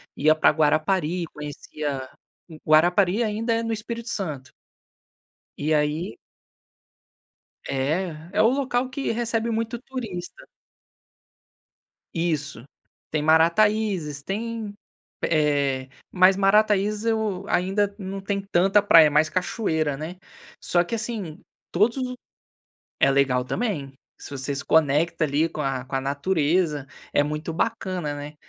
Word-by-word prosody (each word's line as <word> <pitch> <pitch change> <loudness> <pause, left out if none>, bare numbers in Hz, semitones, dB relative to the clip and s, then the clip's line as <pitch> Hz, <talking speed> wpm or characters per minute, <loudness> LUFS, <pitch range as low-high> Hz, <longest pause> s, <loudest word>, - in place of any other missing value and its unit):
Ia 155 +2 +4
pra 155 - +4
Guarapari, 160 +3 +1
conhecia 145 -2 -5 0.6
Guarapari 175 +7 +4
ainda 225 +2 -1
é 230 - 0
no 225 0 -1
Espírito 230 +2 -5
Santo. 155 - -4 1.1
E 155 +2 0
aí 150 -3 0 1.5
É, 155 +8 0 0.2
é 210 - +3
o 220 - +6
local 255 -1 0
que 270 +1 -2
recebe 230 0 -1
muito 230 +1 -2
turista. 240 - -7 1.7
Isso, 155 -7 -2 0.5
tem 155 - 0
Marataízes, 170 0 +2
tem 220 +1 -4 0.5
eh, 140 -4 +1 0.2
mas 185 +1 +5
Marataízes, 210 +1 +3
eu 215 -4 -1
ainda 195 +3 +1
não 195 -1 -6
tem 200 0 -2
tanta 195 +4 +4
praia, 165 -6 +7
mais 150 +1 +3
cachoeira, 160 -6 -1
né? 160 +5 -6 0.5
Só 175 -1 +2
que, 205 +6 -3
assim, 215 -8 -5 0.3
todos 215 +8 +2
os 255 -1 -3 0.9
é 135 - +6
legal 135 -2 +2
também, 145 - -3 0.3
se - - -9
você 140 0 -3
se 140 - -5
conecta, 160 +2 +2
ali, 150 +3 +1
com 155 - -7
a 130 -2 -2
com 135 - -4
a - - 0
natureza, 150 +1 0 0.3
é 145 - +5
muito 150 +2 -4
bacana, 185 -5 -2
né. 145 +1 -7
175 Hz, 120 wpm, -24 LUFS, 150-215 Hz, 1.7 s, praia